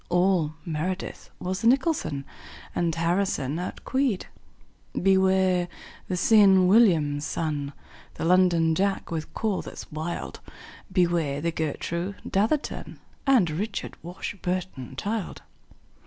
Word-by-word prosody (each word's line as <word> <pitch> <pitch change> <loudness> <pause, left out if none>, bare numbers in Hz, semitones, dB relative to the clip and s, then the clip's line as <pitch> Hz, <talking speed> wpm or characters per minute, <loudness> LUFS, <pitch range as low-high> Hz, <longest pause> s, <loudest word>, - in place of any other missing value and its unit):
All 175 -3 +2
meredith 175 +3 -4
was 185 +2 -3
the 230 - +2
nicholson, 245 - +1 0.5
And 170 -2 0
harrison 165 -4 0
outqueed. 230 +5 -1 0.8
Beware 190 -1 +3 0.4
the 180 - -1
see 220 +5 +4
enn 190 -2 +6
william, 175 -8 +4
son, 145 -1 -3 0.4
The - - -5
londonjack 180 +1 +3
with 160 -1 -4
call 215 -4 0
that's - - -9
wild. 160 +3 -4 0.5
Beware 170 -6 +1
the 170 +3 -1
gertroo 170 +4 -3
datherton 220 +10 -1 0.3
And 250 -10 +5
richardwashburnchild. 180 - -4
180 Hz, 95 wpm, -26 LUFS, 160-195 Hz, 0.8 s, enn